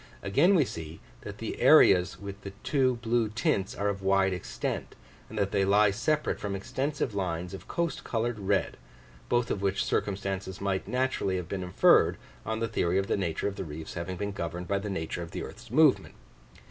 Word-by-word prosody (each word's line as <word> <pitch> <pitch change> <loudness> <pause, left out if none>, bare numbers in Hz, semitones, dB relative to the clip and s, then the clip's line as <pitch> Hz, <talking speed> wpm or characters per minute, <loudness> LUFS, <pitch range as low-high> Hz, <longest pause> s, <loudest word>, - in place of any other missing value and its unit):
Again 145 - +4
we 155 -6 +4
see, 80 -6 -7 0.2
that - - -8
the - - -5
areas 90 0 +6
with 100 0 -8
the 100 - -8
two 130 -3 +2
blue 115 -1 +1
tints 110 - 0
are 100 - -1
of 100 -1 -2
wide 95 0 +3
extent; 90 - -4 0.3
and - - -8
that 100 0 0
they 100 - +2
lie 100 +1 +4
separate 150 +9 0
from 100 -1 -3
extensive 130 +4 -2
lines 90 -2 -3
of 95 - -9
coast 170 -4 -2
coloured 115 -1 -2
red, 95 - 0 0.5
both 120 -1 +1
of 100 - -2
which 100 -1 0
circumstances 95 -1 -2
might 95 -1 -1
naturally 125 -5 0
have 90 -3 -3
been 95 +1 -3
inferred, 90 -1 +4 0.3
on 110 0 -1
the 115 - 0
theory 85 -4 0
of 95 - +1
the - - 0
nature 85 -4 -1
of 100 - -4
the - - -3
reefs 80 -1 -7
having 90 +2 -4
been 100 +2 -3
governed 90 -2 -5
by 100 0 0
the 105 +1 -5
nature 85 -3 -3
of 85 - -6
the - - -5
earth's - - -10
movement. - - +3
100 Hz, 200 wpm, -29 LUFS, 95-115 Hz, 0.5 s, areas